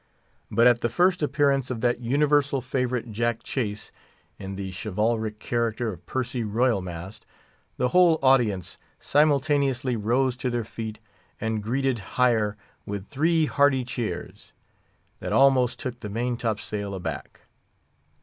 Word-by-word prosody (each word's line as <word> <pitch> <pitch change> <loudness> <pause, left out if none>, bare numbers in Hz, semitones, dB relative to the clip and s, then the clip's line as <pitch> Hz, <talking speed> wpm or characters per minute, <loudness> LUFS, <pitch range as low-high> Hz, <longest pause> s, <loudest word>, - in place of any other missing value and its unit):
But 115 +3 +3
at 120 -1 +5
the 120 - +1
first 180 - +2
appearance 140 -2 +1
of 120 -3 -4
that 120 0 +1
universal 140 +2 +2
favourite, 125 -2 -2
Jack 115 +1 -1
Chase, 110 -5 -3 0.5
in 95 0 -6
the 95 -1 -5
chivalric 110 +2 -1
character 115 0 -1
of 90 -1 -13
Percy 125 -2 -2
Royal 110 0 +1
Mast, 90 +4 -8 0.5
the 125 - +1
whole 175 +1 +5
audience 120 - +2 0.2
simultaneously 140 -3 +2
rose 120 +4 +1
to 130 - -2
their 120 -1 -1
feet, 110 0 -6 0.4
and 110 -1 -2
greeted 130 +3 0 0.2
hire 110 -5 +2 0.3
with 100 -1 -6
three 160 +3 +2
hearty 140 -3 +2
cheers, 110 -7 -5 0.7
that - - -4
almost 130 -2 +4
took 125 -4 -5
the 105 - -6
main 120 +4 -1
top 110 -3 -2
sail 100 -2 -4
aback. 90 - -6
120 Hz, 140 wpm, -25 LUFS, 110-135 Hz, 0.7 s, at